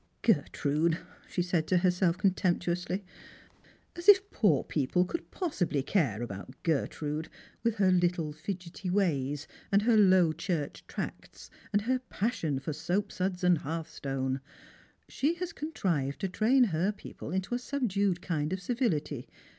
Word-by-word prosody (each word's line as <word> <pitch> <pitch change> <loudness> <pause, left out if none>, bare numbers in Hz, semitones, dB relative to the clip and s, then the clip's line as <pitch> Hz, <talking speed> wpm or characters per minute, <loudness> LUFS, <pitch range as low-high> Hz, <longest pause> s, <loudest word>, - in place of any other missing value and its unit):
"Gertrude!" 155 +3 +2 0.3
she 180 - 0
said 175 -3 0
to 185 - +3
herself 180 -1 +2
contemptuously. 180 0 0 0.9
"As 345 +3 +1
if 400 0 +7
poor 175 - +3
people 160 +5 +1
could 335 - -5
possibly 175 - -1
care 130 - +1
about 100 +3 -7
Gertrude, 155 0 -1 0.3
with 230 -2 +1
her 195 -3 +4
little 175 -4 +1
fidgety 180 +3 -5
ways, 150 -7 0 0.2
and 200 +1 +4
her 235 0 +4
Low 185 -5 +6
Church 165 -3 -3
tracts, - - -7 0.2
and 205 0 +2
her 255 +3 +1
passion 205 - -1
for 145 - -4
Boapsuds 180 +3 -1
and 180 -3 +4
hearthstone! 135 -4 -3 0.7
She 305 +5 0
has 360 0 -4
conti 310 +2 -7
ived 140 -5 +1
to 195 - -2
train 235 +8 +4
her 185 -2 +1
people 205 - -9
into 190 +6 -2
a 245 - +1
subdued 205 -9 0
kind 155 -3 -1
of 190 - -1
civility. 180 - -1
180 Hz, 140 wpm, -30 LUFS, 155-205 Hz, 0.9 s, if